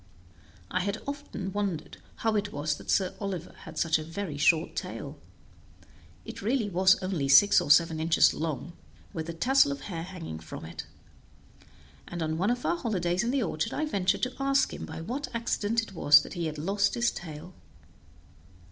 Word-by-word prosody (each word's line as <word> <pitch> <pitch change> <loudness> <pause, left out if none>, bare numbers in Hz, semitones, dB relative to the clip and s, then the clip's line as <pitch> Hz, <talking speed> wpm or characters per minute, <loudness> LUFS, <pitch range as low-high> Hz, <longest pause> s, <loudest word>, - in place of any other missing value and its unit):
I 185 - +1
had 200 +3 -2
often 280 -9 -5
wondered 200 -6 -3 0.2
how 225 -1 0
it 205 0 -1
was 150 -1 -1
that - - -12
Sir 185 -2 +2
Oliver 190 -4 -4
had - - -10
such 165 -1 +2
a - - -5
very 165 0 -5
short 155 +2 +2
tail; - - -6 1.1
it - - -8
really 225 0 0
was 185 +2 +5
only 180 -7 -1
six 200 +9 +7
or - - -4
seven 160 +1 +5
inches 160 +1 +4
long, 160 +1 -4 0.4
with 160 0 -4
a - - -3
tassel 250 - +4
of 140 0 -5
hair 165 +1 -5
hanging 165 - -7
from 80 - -9
it; 80 -1 -8 1.2
and 175 -1 -4
on 160 0 -2
one 195 +4 +2
of 245 0 -1
our 345 - +1
holidays 185 - 0
in 235 - -1
the 265 -1 +1
orchard 160 -4 -2
I 310 - 0
ventured 200 -7 0
to 255 - 0
ask 275 0 +2
him - - -6
by - - -7
what 260 - -4
accident 230 -1 0
it 210 - -10
was 145 -4 +6
that - - -9
he 170 -3 -2
had 155 -1 -5
lost 200 +6 +1
his 235 0 +2
tail. 165 +1 -9
185 Hz, 185 wpm, -28 LUFS, 160-210 Hz, 1.2 s, six